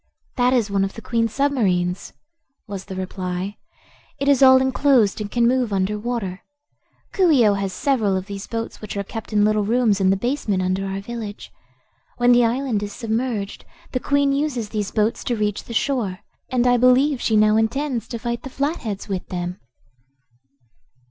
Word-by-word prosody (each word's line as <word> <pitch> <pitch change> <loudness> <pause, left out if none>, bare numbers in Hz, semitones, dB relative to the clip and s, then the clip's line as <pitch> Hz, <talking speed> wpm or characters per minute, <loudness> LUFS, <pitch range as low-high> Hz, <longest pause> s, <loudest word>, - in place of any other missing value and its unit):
"That 250 -1 +3
is 235 -5 +1
one 195 -1 +2
of 195 - -2
the 225 - -8
Queen's 230 -2 0
submarines," 195 -11 0 0.5
was 195 -2 -6
the 190 - -7
reply. 185 +1 -4 0.6
"It 280 0 -2
is 280 -2 +4
all 260 -1 +8
enclosed, 260 -5 +2
and 205 - -4
can 235 +1 +2
move 250 -2 +1
under 200 +2 0
water. 210 -5 -3 0.7
Coo 375 -3 +3
ee 255 -8 +5
oh 205 - +4
has 195 -1 -2
several 225 -7 +1
of 185 - -4
these 200 0 -7
boats 230 -1 -5
which 210 -1 -6
are 200 - -1
kept 225 +3 -8
in 210 -1 +3
little 215 0 +2
rooms 220 -2 +2
in 190 - +4
the 195 - +3
basement 215 -5 -1
under 185 +1 -1
our 195 0 -4
village. 215 -1 -7 0.7
When 245 0 +4
the 245 -1 +5
island 240 -2 0
is 205 0 -5
submerged, 225 -3 -3 0.3
the 255 - -1
Queen 285 +1 +2
uses 275 -7 -1
these 210 -2 -2
boats 215 +1 0
to 240 - 0
reach 210 -2 -2
the - - -10
shore, 225 -6 -1 0.3
and 250 -1 +1
I 245 0 +4
believe 255 +3 +4
she 220 - +2
now 215 0 +4
intends 235 +2 0
to 235 - -5
fight 235 0 -3
the 265 - -8
Flatheads 265 - -3
with 190 -3 -4
them." 180 0 -4
225 Hz, 185 wpm, -22 LUFS, 200-250 Hz, 0.7 s, all